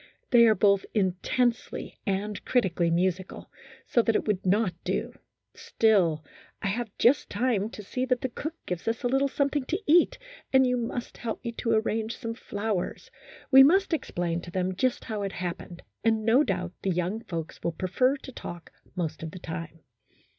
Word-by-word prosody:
They 235 -2 +7
are 220 - +5
both 200 -2 +4
intensely 215 +5 0
and 200 +1 -2
critically 185 -8 +1
musical, 185 +2 -1 0.3
so 240 - +3
that 225 -1 +1
it - - +1
would 205 -3 0
not 195 0 +2
do, - - -2 0.4
still, 175 -9 +2 0.3
I 200 - -1
have 230 +3 -2
just 260 +4 +3
time 215 -2 0
to 210 - -9
see 250 +6 -2
that 250 -1 0
the 260 - -1
cook 310 +7 -5
gives 180 +2 -4
us 225 +2 -1
a - - +2
little 270 +2 +2
something 280 0 0
to 350 +8 -1
eat, 330 +3 +4 0.3
and 265 0 +6
you 250 0 +2
must 240 0 -4
help 230 +1 -5
me 235 - -1
to 230 0 -1
arrange 220 0 0
some 230 0 -4
flow 210 -3 -2
ers; - - -7 0.4
we 265 0 +10
must 365 +6 +5
explain 175 - -2
to 175 - -9
them 185 +1 -1
just 255 +6 0
how 215 -3 -4
it 195 -1 -3
happened, 175 0 -6 0.2
and 220 -1 +2
no 240 +6 +5
doubt 180 -6 -2
the 195 - -1
young 180 +5 -1
folks 165 -3 -5
will 170 - 0
prefer 250 - +1
to 265 - -10
talk 175 -8 -8 0.2
most 165 -3 -3
of 160 - -4
the 170 - -10
time." 165 -2 -7
215 Hz, 185 wpm, -27 LUFS, 180-245 Hz, 0.4 s, we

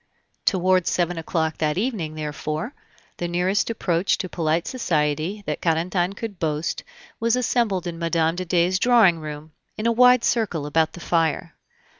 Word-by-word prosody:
Toward 185 -2 +2
seven 175 -1 0
o'clock 160 -1 -2
that 155 +1 0
evening, 195 -9 -2
therefore, 155 - -4 0.4
the 175 - -2
nearest 180 +5 0
approach 185 -5 0
to 185 - -4
polite 165 -1 -1
society 165 - -1
that - - -3
Carentan 175 +3 0
could 205 -3 -6
boast 155 0 -2 0.4
was 230 +1 +2
assembled 230 -7 0
in 170 -1 -5
Mme. 165 -1 +1
de 185 +1 -4
Dey's 180 +1 +2
drawing 220 -9 +5
room, 155 0 -8 0.3
in 215 - -4
a 235 - +4
wide 250 +1 +5
circle, 195 -11 0
about 160 +2 +1
the - - -9
fire. 165 -1 0
175 Hz, 155 wpm, -23 LUFS, 160-200 Hz, 0.4 s, drawing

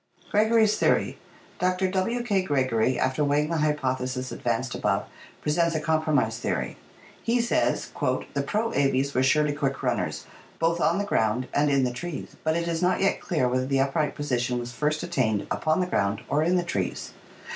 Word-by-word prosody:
Gregory's 220 0 +4
Theory.— - - +1 0.4
Dr. 185 +1 +1
W. 230 +6 0
K. 200 -5 +1
Gregory, 130 -7 +1
after 130 +3 +1
weighing 150 +2 +1
the 165 - +1
hy 150 0 +2
potheses 130 -2 -2
advanced 120 +2 -2
above, - - 0 0.4
presents 170 +2 +1
a - - +1
compromise 150 -7 +1
theory. - - -2 0.5
He 240 +1 +1
says: 235 0 0 0.4
"The - - 0
pro 225 +2 -1
Aves 140 0 +1
were 130 - +2
surely 150 +2 +3
quick 140 -2 -2
runners, - - -1 0.3
both 165 +1 +1
on 170 - +3
the 205 - -1
ground 115 - 0
and 145 +1 +3
in 140 -2 +3
the 125 -1 0
trees, 170 +4 -6
but 160 +1 +1
it 170 0 -2
is 165 0 -1
not 180 0 +2
yet 195 0 +1
clear 150 -9 0
whether 130 +1 0
the 135 0 +1
upright 140 +3 0
position 125 -4 -1
was 120 0 -5
first 150 +3 -1
attained 110 -6 0
upon 155 +3 +1
the - - +1
ground 100 - 0
or 145 - +2
in 175 +3 +2
the 180 - +2
trees. 100 - -3
150 Hz, 185 wpm, -26 LUFS, 130-175 Hz, 0.5 s, Gregory's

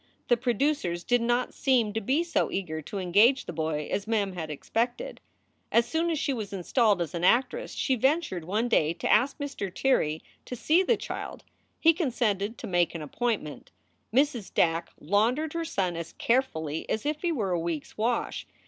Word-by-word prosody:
The 240 - +6
producers 240 - 0
did 245 +3 +2
not 240 +1 0
seem 240 -6 +2
to 225 - -1
be 275 +10 +1
so 335 -2 0
eager 160 -5 -3
to 180 +7 -7
engage 205 +9 +4
the - - -6
boy 155 -2 -2
as 200 +1 -2
Mem 205 -4 0
had 165 -3 -5
expected. 240 - -3 0.5
As 235 0 +4
soon 325 +4 0
as 325 - 0
she 280 - 0
was 215 -5 -5
installed 200 0 +2
as 160 - -8
an 170 0 -3
actress 265 - +2
she 265 - +1
ventured 265 - +1
one 215 +7 0
day 160 -9 +2
to 175 - -2
ask 265 +3 +3
Mr. 280 -10 -4
Tirrey 160 - +1 0.2
to 250 - -5
see 315 +9 +3
the 450 +5 +2
child; - - -6 0.4
he 330 0 +6
consented 235 - -1
to - - -7
make 175 -2 +1
an 160 - -4
appointment. 195 - -3 0.4
Mrs. 255 -4 +1
Dack 165 0 +1
laundered 230 - +1
her 335 0 -2
son 185 - -1
as 170 0 -6
carefully 160 - -1
as 220 - -2
if 300 0 -1
he 345 - 0
were 215 - -1
a 175 - +1
week 165 -3 -2
s - - -18
wash. 230 +2 -1
225 Hz, 190 wpm, -27 LUFS, 175-265 Hz, 0.5 s, The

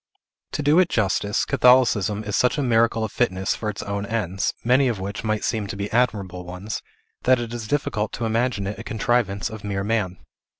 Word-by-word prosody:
To 150 - -2
do 150 +4 +5
it 180 -2 +4
justice, 105 0 +1
Catholicism 125 -6 +4
is 105 -1 -3
such 125 +4 +2
a 145 - 0
miracle 115 -2 +2
of 110 - -3
fitness 95 -5 0
for 110 - -3
its 105 - -5
own 100 0 -3
ends, 100 -4 -1
many 130 +3 +4
of 115 -5 -1
which 100 +3 -5
might 110 -1 -1
seem 110 -3 -1
to 100 - -5
be 100 +1 -4
admirable 100 -7 0
ones, 90 +4 -6 0.4
that 130 0 +5
it 120 -1 -5
is 115 -2 -5
difficult 110 -5 -1
to 120 - -3
imagine 115 -2 0
it 100 +3 -4
a - - -6
contrivance 110 -2 0
of 110 -2 -8
mere 100 -1 -2
man. 100 -4 -1
110 Hz, 205 wpm, -23 LUFS, 100-120 Hz, 0.4 s, do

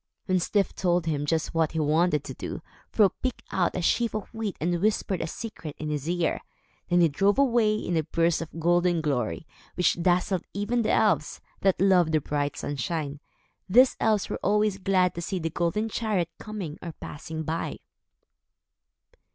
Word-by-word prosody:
When 185 -1 +2
Styf 195 +2 +1
told 175 -2 +1
him 145 -2 -1
just 160 0 0
what 165 -1 +1
he 160 - -1
wanted 155 0 +2
to - - -7
do, - - -6 0.3
Fro 210 -3 +4
picked 255 +6 -4
out 180 -2 +1
a 180 - -2
sheaf 230 +4 +1
of 215 0 -5
wheat 220 -3 -3
and 170 +2 0
whispered 205 -3 0
a 165 - -2
secret 165 -6 -7
in 155 0 -4
his 150 +1 -3
ear. 175 -1 0 0.5
Then 175 0 +4
he 170 - +6
drove 195 - +2
away, 235 -6 +3
in 180 -5 -2
a 160 - +3
burst 165 +2 +1
of 165 0 -7
golden 175 0 +2
glory, 140 -2 -1 0.3
which 175 -1 +2
dazzled 180 +1 +1
even 215 +4 0
the 215 - 0
elves, 175 -9 +2 0.2
that 195 -1 +2
loved 180 -4 +4
the 155 - +4
bright 145 0 -2
sunshine. 145 +1 -3 0.5
These 250 +6 +6
elves 215 -3 +2
were - - -4
always 210 0 +2
glad 185 -2 +2
to 170 - -5
see 185 +2 -3
the 165 -2 -3
golden 175 +7 0
chariot 210 -6 -1
coming 200 -8 -6
or 170 -2 -6
passing 160 +2 -7
by. 160 +2 -3
175 Hz, 180 wpm, -27 LUFS, 160-205 Hz, 0.5 s, he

